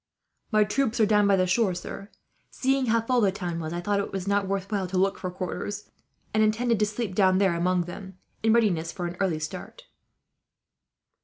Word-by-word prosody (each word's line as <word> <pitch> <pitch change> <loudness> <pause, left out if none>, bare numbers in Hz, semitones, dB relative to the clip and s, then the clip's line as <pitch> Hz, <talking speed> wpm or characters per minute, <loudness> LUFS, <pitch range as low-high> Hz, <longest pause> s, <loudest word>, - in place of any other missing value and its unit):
"My 215 -1 +5
troops 225 +3 0
are 220 - +6
down 210 -1 +3
by 200 - +5
the 185 -1 +2
shore, 185 0 +2
sir. 195 +3 -7 0.4
Seeing 265 0 0
how 230 0 +3
full 245 +2 +1
the 200 -3 +3
town 175 -3 -4
was, 160 -1 -4
I 175 +1 -3
thought 200 +3 0
it 200 - -3
was 195 -1 -4
not 200 -1 +1
worth 195 +1 -3
while 195 -3 -1
to 185 +1 -3
look 195 +1 +1
for 185 - -3
quarters; 185 +3 -5 0.4
and 215 - +3
intended 225 +1 +2
to 210 - +2
sleep 215 -1 -3
down 185 -1 +4
there 190 -2 +3
among 180 +1 +1
them, 190 +2 -9 0.2
in 225 - +3
readiness 185 -8 +2
for 180 -1 -5
an 175 0 -4
early 185 -5 +1
start." 155 0 -7
195 Hz, 210 wpm, -26 LUFS, 185-215 Hz, 0.4 s, are